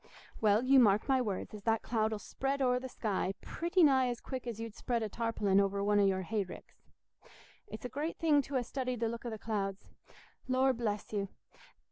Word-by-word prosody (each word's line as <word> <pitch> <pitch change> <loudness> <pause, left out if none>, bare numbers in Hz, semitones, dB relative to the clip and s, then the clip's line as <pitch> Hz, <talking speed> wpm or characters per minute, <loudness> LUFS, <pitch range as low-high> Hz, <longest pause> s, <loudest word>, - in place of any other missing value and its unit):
"Well, 215 +1 +4
you 270 +1 +6
mark 210 -3 +4
my 265 -2 +3
words, 205 -4 -3
as 210 - -8
that 225 -1 +2
cloud 220 -1 0
'ull 215 - -2
spread 270 +6 -3
o'er 250 -2 +2
the 260 +1 -7
sky 195 -5 -2
pretty 345 +2 +1
nigh 265 -4 +5
as 240 -1 -3
quick 255 -2 -6
as 230 -2 -4
you'd 225 -1 -5
spread 235 0 -2
a 215 - -2
tarpaulin 210 -3 +1
over 200 0 +1
one 205 0 +3
o' - - +5
your 190 -1 +2
hay 210 +3 -1
ricks. 185 - -13 0.8
It's 215 - -8
a 250 +2 -7
great 315 +3 -2
thing 305 -3 +4
to 275 0 -3
ha' - - -2
studied 255 -1 -3
the 230 - +1
look 235 +1 -5
o' - - -2
the 220 - -5
clouds. 200 -3 -3 0.6
Lord 260 0 +2
bless 210 -3 -3
you! 200 -1 -1
230 Hz, 215 wpm, -33 LUFS, 205-260 Hz, 0.8 s, you